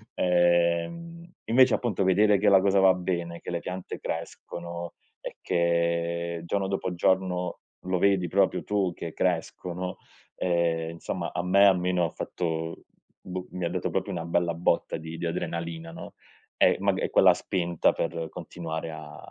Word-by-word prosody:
Ehm, 90 - +1 0.2
invece, 125 +1 +5
appunto, 115 -5 0
vedere 100 +2 +4
che 105 +1 +3
la 95 - +7
cosa 100 0 +3
va 95 -1 +6
bene, 85 -2 -3
che - - -9
le 85 - -1
piante 90 +2 -6
crescono 85 0 -6 0.3
e - - -8
che, 85 0 0
giorno 95 +2 -1
dopo 95 -2 -2
giorno, 90 0 0 0.2
lo 95 0 0
vedi 95 -1 +3
proprio 95 +3 +2
tu 100 -3 0
che 85 - -7
crescono, 90 +1 -2 0.4
ehm, 85 -2 0
insomma, 85 - -4
a 90 - -1
me 100 +2 +5
almeno 90 -2 +3
ha - - -2
fatto 80 -1 -4 0.4
boh, 90 0 -6
mi 90 -1 -3
ha - - 0
dato 90 +1 -2
proprio - - -2
una 80 - -4
bella 85 0 +1
botta 85 0 0
di 80 +1 -8
di - - -4
adrenalina, 85 0 -4
no, - - -9 0.4
ehm, - - +5
mag - - +2
è - - -1
quella - - +6
spinta 85 -3 0
per 85 0 -3
continuare 80 -1 -6
a 80 0 -9
85 Hz, 160 wpm, -27 LUFS, 85-95 Hz, 0.4 s, la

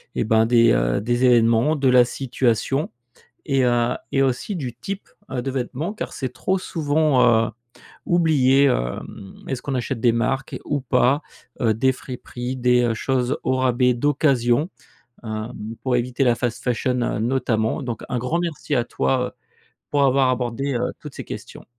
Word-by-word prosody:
et - - 0
ben, 110 +1 +3
des, 115 0 +5
heu, - - +1
des 120 +4 0
événements, 120 +4 +4
de 135 -2 +1
la 125 -1 +6
situation 130 +2 -1 0.6
et 135 -3 +2
heu 120 -1 +2 0.2
et 135 - +3
aussi 135 - -1
du 130 -7 -4
type, 195 - -7 0.2
heu, 130 -2 -2
de 135 - -3
vêtements. 135 +7 -3
Car - - -5
c'est 130 -3 -4
trop 190 +8 -1
souvent, 155 -5 +1 0.2
heu, - - -6 0.5
oublié, 145 -6 +3
hem, 95 - -2
est-ce 130 -2 -3
qu'on 140 - -3
achète 125 0 -3
des 120 - +4
marques 135 +4 -1
ou 145 -1 -1
pas, 130 +2 +2 0.4
heu, 115 -2 +3
des 130 +5 +2
friperies, 125 0 -6
des 125 -1 +3
choses 130 +2 -1
au 130 - +1
rabais, 125 -1 +2
d'occasion, 135 +1 +2 0.6
hem, 110 0 -5 0.3
pour 130 -2 +1
éviter 125 +2 0
la 120 -1 +4
fast 120 -1 -3
fashion 125 +1 0 0.3
notamment? 115 0 0
Donc 120 -5 -5
un 125 - -1
grand 125 +8 -1
merci 165 -4 -3
à 120 - +2
toi, 65 - 0
heu, - - -21 0.6
pour 145 -1 +2
avoir 135 -1 +3
abordé, 130 +2 -1
heu, 125 +1 -1
toutes 150 -2 -10
ces - - -6
questions. - - -9
125 Hz, 170 wpm, -22 LUFS, 120-140 Hz, 0.6 s, la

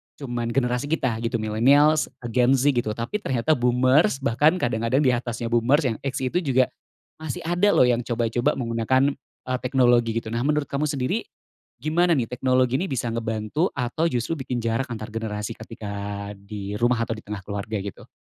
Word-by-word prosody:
cuman 120 -4 -4
generasi 125 +2 0
kita 130 -8 0
gitu, 115 +1 -2
milenials, 135 +8 +3 0.2
Gen 125 +2 +4
Z 135 +2 +3
gitu, 120 -5 -1
tapi 120 - -3
ternyata 135 - 0
boomers 130 - +3
bahkan 145 +7 +3
kadang-kadang 120 -2 0
di 130 - +4
atasnya 120 -1 -3
boomers 125 +6 +3
yang 120 -5 0
X 135 -1 -3
itu 130 +8 +1
juga 130 -6 +2 0.5
masih 155 -4 -5
ada 175 +4 +2
loh - - +6
yang 120 -1 +2
coba-coba 120 +4 0
menggunakan, 130 +3 +1 0.4
eee, 130 - +1
teknologi 120 -3 +3
gitu. 110 - -8
Nah 115 - -1
menurut 150 0 +1
kamu 145 +2 0
sendiri, 135 -3 -1 0.5
gimana 165 +5 +2
nih 120 -5 -1
teknologi 130 0 +2
ini 190 - -1
bisa 120 -3 -1
ngebantu 115 - -1
atau 135 +5 0
justru 150 +2 -2
bikin 125 -3 -3
jarak 115 +4 0
antar 110 -1 -6
generasi 110 -1 -4
ketika 100 -2 -6
di 100 0 -6
rumah 120 -1 +2
atau 115 - -4
di 110 - -11
tengah 100 -2 -6
keluarga, 100 +2 -4
gitu? 100 - -8
125 Hz, 175 wpm, -24 LUFS, 115-140 Hz, 0.5 s, loh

